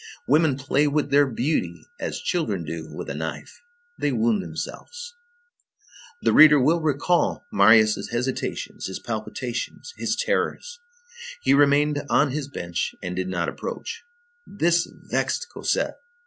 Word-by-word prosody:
Women 150 -1 +3
play 140 +2 +1
with 145 +1 0
their 145 0 +5
beauty 135 +5 -2
as - - -3
children 110 - -1
do 80 0 -6
with - - -7
a - - -4
knife. 80 - -6 0.4
They 145 - +1
wound 115 -2 +1
themselves. 480 - -7 1.1
The - - +3
reader 150 -1 +8
will 160 +6 +3
recall 155 +6 +1
Marius' 110 +2 +5
hesitations, 125 +3 -3
his 95 - -5
palpitations, 120 - -5
his - - -1
terrors. 485 0 -2 0.6
He - - +4
remained 145 +1 +4
on 140 -1 +3
his 145 0 -3
bench 85 -10 -4
and 90 -1 -4
did 95 0 -2
not 85 -2 -1
approach. - - -5 0.5
This 175 -3 +1
vexed - - -2
Cosette. - - -1
140 Hz, 135 wpm, -24 LUFS, 110-155 Hz, 1.1 s, reader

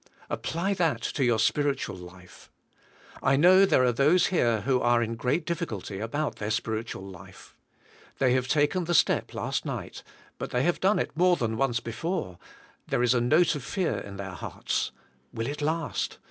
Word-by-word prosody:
Apply 170 +5 -1
that 170 -5 0
to 140 - -1
your 120 -2 +3
spiritual 140 -1 0
life. 90 0 -14 0.7
I 135 - +3
know 185 +6 +6
there 130 - +4
are 125 - +4
those 145 +9 +4
here 120 - +1
who 125 +3 +1
are 120 0 +3
in 115 0 -3
great 125 +8 -1
diffi 170 0 -2
culty 100 -2 -6
about 145 +7 -2
their 105 - -4
spiritual 110 -2 -3
life. 95 -1 -13 0.6
They 130 -2 +3
have 130 0 0
taken 150 +6 +1
the 175 +1 0
step - - +2
last - - -2
night, - - -6 0.4
but - - -4
they 125 +1 0
have 175 +1 +1
done 195 +3 +3
it - - -2
more 180 +2 +4
than 115 -7 -2
once 120 -1 +1
before, 115 - -4 0.5
there 120 - 0
is 125 0 +4
a 120 - +2
note 155 +8 +4
of 145 -4 -5
fear 180 +5 -1
in 100 -1 -9
their 100 0 -5
hearts. 85 - -3 0.4
Will 115 0 -3
it 145 +3 -4
last? 160 +1 -2
130 Hz, 185 wpm, -27 LUFS, 110-165 Hz, 0.7 s, know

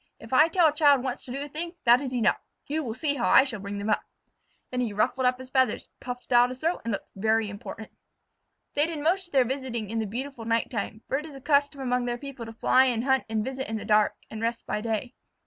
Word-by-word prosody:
If 225 +3 -10
I 300 +5 +7
tell 340 0 +3
a - - -4
child 285 -4 +4
once 255 -2 -4
to 250 - -8
do 275 +2 -3
a - - -6
thing, 335 +4 -5
that 240 +2 +6
is 265 -3 -4
enough. 245 -3 +2 0.3
You 310 +2 -2
will 225 -4 -4
see 290 +1 0
how 240 - +1
I 265 - +7
bring 205 -6 -5
them 205 +2 -1
up." - - +2 0.7
Then 250 0 -1
he 230 -4 -2
ruffled 250 +5 +1
up 250 0 +2
his 260 0 -11
feathers, 260 -5 +1
puffed 250 0 -5
out 240 +1 +6
his 255 0 -8
throat, 330 +3 0
and 230 - -2
looked 200 - -5
very 220 +2 +1
important. 205 +2 -8 0.8
They 295 +2 +2
did 330 -2 -4
most 360 +3 +1
of - - -28
their 265 -3 +4
visiting 240 -4 -3
in 225 - -1
the 220 - -1
beautiful 255 +3 -5
night 230 0 0
time, 220 -1 -4
for 270 - 0
it 305 - -8
is 295 - -11
a - - -8
custom 285 0 +1
among 250 -1 0
their 240 0 -2
people 260 -3 -8
to 225 - -8
fly 255 +3 +4
and 240 -3 0
hunt 265 0 +2
and 220 -1 -1
visit 265 -1 -4
in 220 - -2
the - - -7
dark, 210 -1 +3 0.2
and 220 - -6
rest 230 0 -2
by 210 - -2
day. 225 +2 -2
250 Hz, 260 wpm, -27 LUFS, 225-275 Hz, 0.8 s, I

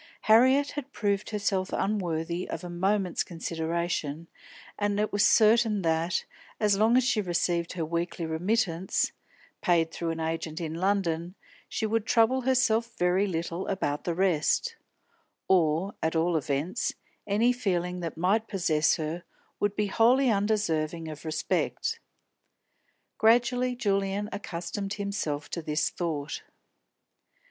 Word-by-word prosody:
Harriet 260 +6 +5
had 285 -1 -6
proved 205 -3 -1
herself 200 -3 -1
unworthy 175 -4 -1
of 165 - -5
a 175 - -6
moment's 190 +1 0
consideration, 165 -2 -3 0.5
and 205 0 0
it 215 - -1
was 205 0 +3
certain 220 -1 +4
that, 165 +2 0 0.3
as 210 -2 +3
long 220 +4 +4
as 255 - +4
she 235 -3 +2
received 175 -2 -1
her 170 -3 -2
weekly 170 +1 -2
remittance 180 +2 0 0.5
paid 165 -2 +2
through 170 0 -3
an 165 0 -3
agent 160 -1 -3
in 160 -2 -4
London, 175 -1 -1 0.3
she 220 - -2
would 220 0 0
trouble 235 +3 +3
herself 235 -3 +1
very 180 +3 +2
little 170 0 -3
about 145 -6 -1
the 170 - -2
rest; 190 - +1 0.7
or, 175 +1 +2
at 160 +1 0
all 165 +1 +2
events, 150 +3 -1 0.3
any 225 +5 +3
feeling 180 -7 -1
that 165 -2 -5
might 200 +6 +1
possess 160 -6 +2
her 160 +2 -4 0.4
would 205 0 0
be 210 - +1
wholly 240 +5 +4
undeserving 170 -6 0
of 150 -2 -8
respect. 305 - -1 1.2
Gradually 245 +2 +3
Julian 200 -2 0
accustomed 195 +1 -4
himself 200 -8 -3
to 170 - -3
this 150 0 0
thought. 155 -5 -3
185 Hz, 130 wpm, -28 LUFS, 165-215 Hz, 1.2 s, Harriet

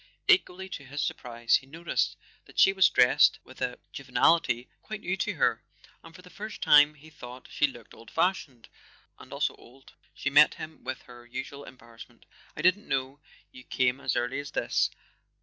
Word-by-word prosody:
Equally 190 - +3
to 140 - -7
his 145 +2 -4
surprise 120 -2 0
he 135 - -14
noticed 165 +4 -2 0.3
that - - -19
she 195 - +6
w 195 - -13
r - - -12
as 185 - +7
dressed 125 0 +5
with - - -16
a - - -2 0.2
juvenility 130 -7 +1
quite 215 -1 -7
new 180 - -2
to - - -1
her; - - +1 0.4
and 165 0 -14
for 180 - -14
the 180 - -15
first 215 +1 -8
time 150 +1 +6
he 155 +2 -17
thought 125 -2 -11
she 145 - +2
looked 120 -5 -13
old 115 0 -14
fashioned 165 -9 -1 0.5
and - - -14
also - - -1
old. 130 +3 -18 0.2
She 140 - -3
met 150 +2 +6
him 155 0 -10
with 130 - -6
her 120 -1 -15
usual 135 +3 -7
embarrassment. 115 -3 -15 0.3
"I - - -5
didn't 185 +4 +3
know 135 +1 -2 0.3
you 125 - -13
came 130 +1 0
as 130 -2 -1
early 120 +3 -1
as 145 0 -6
this. - - 0
140 Hz, 190 wpm, -28 LUFS, 125-170 Hz, 0.5 s, as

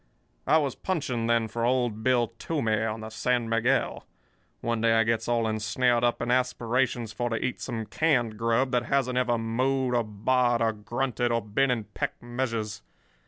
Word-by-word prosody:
"I 160 - +5
was 140 -5 0
punching 130 -11 -2
then 115 -1 +2
for 115 +2 -4
old 120 -3 +1
Bill 120 -1 +2
Toomey, 115 -10 0
on 110 0 -3
the 110 0 -7
San 120 +1 0
Miguel. 115 +4 0 0.5
One 115 -1 -1
day 115 0 +4
I 115 0 +4
gets 115 0 0
all 120 -1 +1
ensnared 115 +3 +1
up 120 0 +1
in 120 - -1
aspirations 125 -2 0
for 120 +1 -2
to 115 - -1
eat 125 +3 -3
some 115 -4 -4
canned 125 -6 +1
grub 115 +4 +1
that 120 -1 +1
hasn't 130 -1 +1
ever 120 -2 +1
mooed 125 +3 0
or 120 -1 +2
baaed 120 +3 +1
or 115 -1 +1
grunted 120 +2 -2
or 115 - +2
been 120 +6 +1
in 120 -3 0
peck 105 - -4
measures. 115 -4 -3
120 Hz, 180 wpm, -27 LUFS, 115-125 Hz, 0.5 s, I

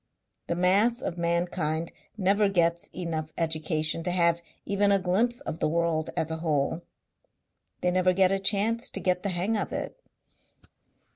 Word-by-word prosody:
The 170 - -1
mass 200 +7 +3
of 175 -8 -4
mankind 170 -1 -1 0.3
never 200 +1 +3
gets 170 -2 +1
enough 160 -3 -4
education 155 0 -1
to 175 - -2
have 170 -1 +2 0.2
even 200 0 +2
a 200 - +5
glimpse 205 +7 0
of 160 - -5
the - - +1
world 165 -1 0
as 160 - -1
a 160 - -2
whole. 160 0 0 1.0
They 180 - +2
never 185 0 +3
get 185 0 +4
a 195 - +1
chance 220 +4 +1
to - - -3
get 180 -1 0
the 200 - -2
hang 185 +5 0
of 210 - -2
it. - - -5
180 Hz, 160 wpm, -27 LUFS, 165-195 Hz, 1.0 s, a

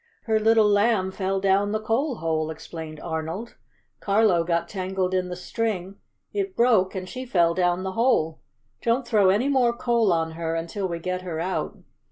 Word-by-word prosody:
"Her 220 -1 +1
little 220 0 +4
Lamb 205 -2 +2
fell 195 0 -1
down 195 +1 +2
the 215 - 0
coal 240 +6 0
hole," 160 -4 -1
explained 160 -1 -8
Arnold. 165 +7 -4 0.5
"Carlo 200 -4 +3
got 170 0 0
tangled 185 -1 -2
in 185 -1 0
the 180 - -4
string, 195 0 -3 0.4
it 395 -2 -2
broke 220 -7 +3
and 185 -1 -4
she 255 +6 -6
fell 175 -9 +2
down 180 0 +1
the 190 - -3
hole. 190 -8 +1 0.4
Don't 235 +2 0
throw 210 -5 +4
any 210 +8 +2
more 250 -4 +2
coal 235 -5 +2
on 165 -1 0
her 165 0 -3
until 170 +4 -3
we 170 -2 -3
get 185 +2 -3
her 170 -3 -5
out." 185 +3 -2
190 Hz, 180 wpm, -25 LUFS, 170-225 Hz, 0.5 s, little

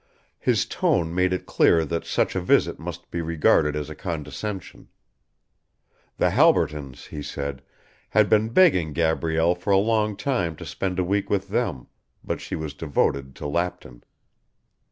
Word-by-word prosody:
His - - +1
tone 85 -1 0
made 90 +1 +2
it 90 - -2
clear 80 -1 +3
that 85 +2 -3
such - - 0
a 95 - 0
visit 90 - +2
must - - -8
be 85 - -2
regarded 80 -2 +2
as 75 -1 -3
a 75 - -7
condescension. 90 +4 -6 1.3
The - - +2
Halbertons, 70 -4 +2
he 75 - -6
said, 70 -2 -5 0.5
had 105 -1 +4
been 110 +1 +3
begging 115 - +4
Gabrielle 80 +1 +1
for 90 +3 -7
a 100 - +5
long 105 0 +1
time 95 - -1
to - - -9
spend 95 -2 -3
a 90 - +2
week 100 +3 -1
with 100 -1 -1
them, 105 - -1 0.4
but - - -3
she - - -5
was 80 -2 -5
devoted 70 -3 -1
to - - -8
Lapton. 80 -6 -3
85 Hz, 155 wpm, -24 LUFS, 75-100 Hz, 1.3 s, a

